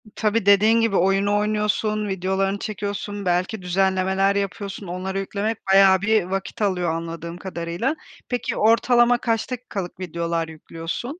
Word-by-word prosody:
Tabii, 215 -1 0
dediğin 215 +3 +5
gibi, 225 -3 +1
oyunu 195 +3 +2
oynuyorsun, 210 0 0
videolarını 190 +1 -1
çekiyorsun, 205 -1 -4
belki 180 +3 0
düzenlemeler 190 +1 +1
yapıyorsun, 200 0 -4
onlara 185 +2 -3
yüklemek 205 +3 -2
bayağı 195 -1 +6
bir 215 -1 +3
vakit 195 +3 -4
alıyor 180 -4 +1
anladığım 170 +1 -6
kadarıyla. 180 - -3 0.3
Peki 245 -1 -2
ortalama 240 +2 +4
kaç 230 0 -1
dakikalık 205 -8 -5
videolar 170 -2 -2
yüklüyorsun? 165 - -6
195 Hz, 130 wpm, -23 LUFS, 180-215 Hz, 0.3 s, bayağı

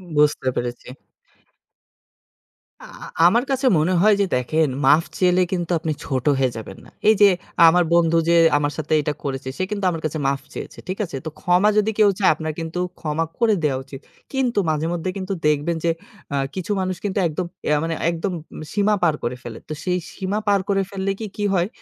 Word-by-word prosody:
বুঝতে 150 -3 +2
পেরেছি। 120 0 -4 1.9
আ - - -12 0.2
আ - - -7 0.2
আমার 235 +7 +3
কাছে 265 0 0
মনে 175 +4 +1
হয় 215 +1 +6
যে - - +3
দেখেন, 155 +5 +1 0.2
মাফ 155 +4 +6 0.2
চাইলে 180 0 +4
কিন্তু 175 -1 -2
আপনি 160 -1 -2
ছোট 130 -2 -2
হয়ে 130 -2 +2
যাবেন 110 - -8
না। - - -15 0.2
এই 220 - +6
যে 200 - +9 0.4
আমার 175 +2 +5
বন্ধু 165 -1 +4
যে 170 - +5 0.2
আমার 145 0 0
সাথে 155 0 -2
এটা 150 0 -2
করেছে 135 -1 -4
সে 185 - -1
কিন্তু 200 -2 -2
আমার 165 -2 -5
কাছে 155 0 -2
মাফ 135 0 0
চেয়েছে। - - -8
ঠিক 185 - -3
আছে? 165 - -8
তো 160 - -2
ক্ষমা 180 +4 +3
যদি 210 +1 +3
কেউ 210 -1 +6
চায়, 195 - +5
আপনার 155 0 -4
কিন্তু 165 +2 -4 0.2
ক্ষমা 160 0 -1
করে 230 -2 +4
দেওয়া 140 -3 +1
উচিত। 135 +1 -11 0.3
কিন্তু 250 -5 +1
মাঝেমধ্যে 165 +3 -1
কিন্তু 190 +1 -3
দেখবেন 150 +3 +1
যে 165 - +3 0.4
আ 140 - +1 0.2
কিছু 185 +2 -4
মানুষ 185 0 -2
কিন্তু 200 0 -1
একদম 165 +3 -3 0.2
ইয়া 150 - +3
মানে 165 0 -2
একদম 170 +3 -2 0.4
সীমা 210 0 +2
পার 165 -3 +4
করে 120 +1 -2
ফেলে। 115 -2 -7
তো 155 - -2
সেই 180 -1 0 0.2
সীমা 195 +2 -2
পার 200 -1 +4
করে 195 -1 +2
ফেললে 195 0 -2
কি, 225 - -4
কি 205 - -2
হয় 180 -1 +2
170 Hz, 200 wpm, -22 LUFS, 150-195 Hz, 1.9 s, যে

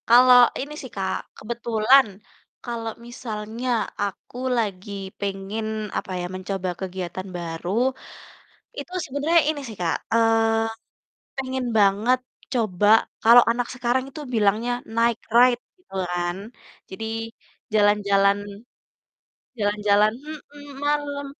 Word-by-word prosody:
Kalau 250 +1 +8 0.2
ini 285 +3 -5
sih 260 - -8
Kak, 190 -1 -1 0.2
kebetulan 235 +3 +3 0.6
kalau 230 -2 -4 0.2
misalnya 230 0 -5 0.3
aku 205 +4 -5 0.2
lagi 205 -3 -2 0.3
pengen 200 +2 -3 0.3
apa - - -4
ya, - - -3
mencoba 185 0 -3
kegiatan 185 0 -5
baru, 170 0 -5 1.1
itu 360 - -7
sebenernya 290 +5 +2
ini 300 -2 -4
sih 220 - -8
Kak, 170 -2 +1 0.2
eee, 225 0 +2 0.5
pengen 260 -1 -2
banget 210 +5 +3 0.3
coba, 210 -5 +1 0.4
kalau 235 +2 +8
anak 240 +1 -2
sekarang 250 +1 0
itu 300 +3 -8
bilangnya 220 +2 +2 0.2
night 230 0 +2 0.2
ride 245 0 +6 0.2
gitu 365 - -23 0.2
kan. 175 0 -1 0.5
Jadi 190 +4 -6 0.7
jalan-jalan 200 -1 +4 1.2
jalan-jalan 210 0 +3 0.4
mhm, 290 0 -12 0.2
malam. 290 -1 -1
225 Hz, 105 wpm, -24 LUFS, 200-245 Hz, 1.2 s, Kalau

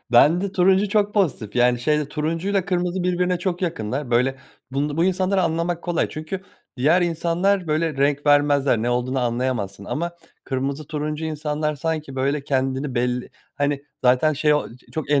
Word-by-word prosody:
bende 175 +10 +5
turuncu 190 +2 +3
çok 205 0 +1
pozitif 135 - 0
yani 125 0 +4
şeyde 150 +2 +1
turuncuyla 165 +6 -1
kırmızı 180 0 -1
birbirine 180 0 +1
çok 180 0 -2
yakınlar 130 -4 -2
böyle 125 +3 +2 0.3
bun 145 +2 -1
bu 165 - +3
insanları 190 +1 +1
anlamak 170 +1 -1
kolay 175 -2 0
çünkü 155 +5 -5 0.4
diğer 155 +8 +3
insanlar 175 +3 +1
böyle 155 0 0
renk 145 +1 +1
vermezler, 145 -4 +4
ne 120 - 0
olduğunu 125 +2 0
anlayamazsın. 120 -5 -2
Ama 170 +9 -2 0.3
kırmızı, 135 +2 -3
turuncu 150 0 -3
insanlar 150 0 -2
sanki 155 -2 -3
böyle 140 +2 0
kendini 135 0 -1
belli 125 0 -1 0.3
hani 145 -1 -1 0.2
zaten 130 +5 +4
şey 150 +1 +2
o 150 - -1
ç - - -25
çok 155 -2 -4
ener 145 - +4
150 Hz, 160 wpm, -22 LUFS, 135-175 Hz, 0.4 s, bende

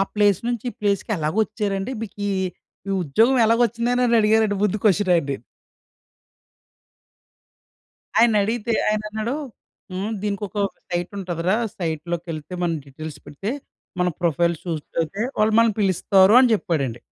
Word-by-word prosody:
Place 205 -3 +4
నుంచి 240 0 -2
ఈ - - -22
ప్లేస్‌కి 205 +1 0
ఎలాగొచ్చారండి? 200 +5 -1
మీకీ 205 -1 -4 0.6
ఈ - - 0
ఉద్యోగం 225 - +3
ఎలాగొచ్చిందని 235 +1 +2
అడిగారండి 210 -1 +3
ముందు 210 +1 +1
క్వెషన్ 200 -2 +3
ఆయన్ని. 140 -5 -1 2.8
ఆయన 230 -1 +5
అడిగితే 230 +2 -1 0.2
ఆయనన్నాడు 215 +4 -2 0.6
హ్మ్, 200 +4 -3
దీనికొక 205 -1 -3 0.3
సైట్ 175 0 -2
ఉంటదిరా 180 +1 -1 0.2
సైట్‌లోకెళ్తే 165 0 -4
మనం 170 -1 +1
డీటెయిల్స్ 150 +2 -9
పెడితే 150 +9 -5 0.5
మన 180 - +3
ప్రొఫైల్ 170 0 +2
సూట్ 160 -4 -4
అవుతే 195 +7 -2 0.2
వాళ్ళు 215 +1 +3
మనల్ని 230 -2 +4
పిలుస్తారు 190 +2 +4
అని 255 - +5
చెప్పాడండి. 135 - -2
200 Hz, 115 wpm, -22 LUFS, 170-220 Hz, 2.8 s, ఆయన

